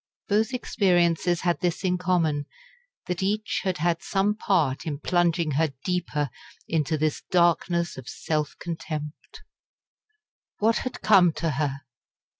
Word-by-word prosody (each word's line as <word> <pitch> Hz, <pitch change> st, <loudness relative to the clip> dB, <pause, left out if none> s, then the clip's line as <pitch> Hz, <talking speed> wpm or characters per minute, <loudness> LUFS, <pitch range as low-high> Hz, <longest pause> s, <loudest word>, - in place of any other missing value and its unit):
Both 215 Hz, +4 st, +2 dB
experiences 175 Hz, -7 st, +2 dB
had 175 Hz, -1 st, +1 dB
this 175 Hz, -1 st, -1 dB
in 180 Hz, -1 st, +1 dB
common 165 Hz, -5 st, +1 dB, 0.6 s
that 180 Hz, 0 st, -3 dB
each 210 Hz, +3 st, -1 dB
had 185 Hz, -2 st, -1 dB
had 170 Hz, 0 st, 0 dB
some 200 Hz, +1 st, +1 dB
part 165 Hz, -10 st, 0 dB
in 145 Hz, -2 st, -2 dB
plunging 170 Hz, 0 st, +1 dB
her 150 Hz, +1 st, +1 dB
deeper 150 Hz, -7 st, -1 dB, 0.4 s
into 155 Hz, -1 st, 0 dB
this 155 Hz, 0 st, 0 dB
darkness 170 Hz, -1 st, +2 dB
of 130 Hz, -2 st, -8 dB
self 150 Hz, -2 st, -2 dB
contempt. 160 Hz, -3 st, -6 dB, 1.1 s
What 225 Hz, +2 st, +2 dB
had 255 Hz, -, -5 dB
come 185 Hz, -6 st, +6 dB
to 165 Hz, 0 st, -1 dB
her? 140 Hz, 0 st, -2 dB
170 Hz, 130 wpm, -26 LUFS, 155-185 Hz, 1.1 s, come